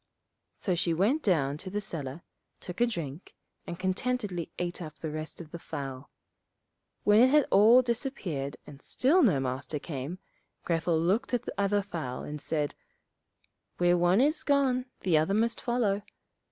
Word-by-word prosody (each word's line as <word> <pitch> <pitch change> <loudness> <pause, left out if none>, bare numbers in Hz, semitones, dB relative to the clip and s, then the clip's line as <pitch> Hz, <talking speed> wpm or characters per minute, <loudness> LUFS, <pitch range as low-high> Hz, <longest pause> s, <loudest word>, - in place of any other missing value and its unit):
So 185 - -1
she 170 -1 +1
went 225 - +2
down 145 - +1
to 185 - -7
the 205 +2 -2
cellar, 155 -6 -6 0.4
took 180 -1 -8
a - - +7
good - - -2
drink, 165 - -6 0.3
and 170 - -5
contentedly 190 -1 -2
ate 175 0 -3
up 155 -2 -8
the 160 - -5
rest 155 +1 -6
of 160 -3 -10
the 170 - -7
fowl. 135 -3 -6 0.9
When 210 +1 +5
it 250 +2 +7
had 295 0 +5
all 230 +5 +7
disappeared 215 - -3
and 140 -1 -12
still 300 - +3
no 195 - +4
Master 130 +3 -3
came, 145 +2 -5 0.5
Grethel 165 -1 +1
looked 210 +10 +1
at 240 - -2
the - - -5
other 200 0 +1
fowl 155 -10 -5
and 150 0 -6
said, 150 -1 -1 1.0
'Where 175 0 +4
one 175 +5 +4
is 300 +4 +2
gone 270 -3 +2 0.2
the 170 -5 +3
other 160 +6 +1
must 230 +2 +1
follow. 230 -5 0
180 Hz, 165 wpm, -29 LUFS, 155-230 Hz, 1.0 s, a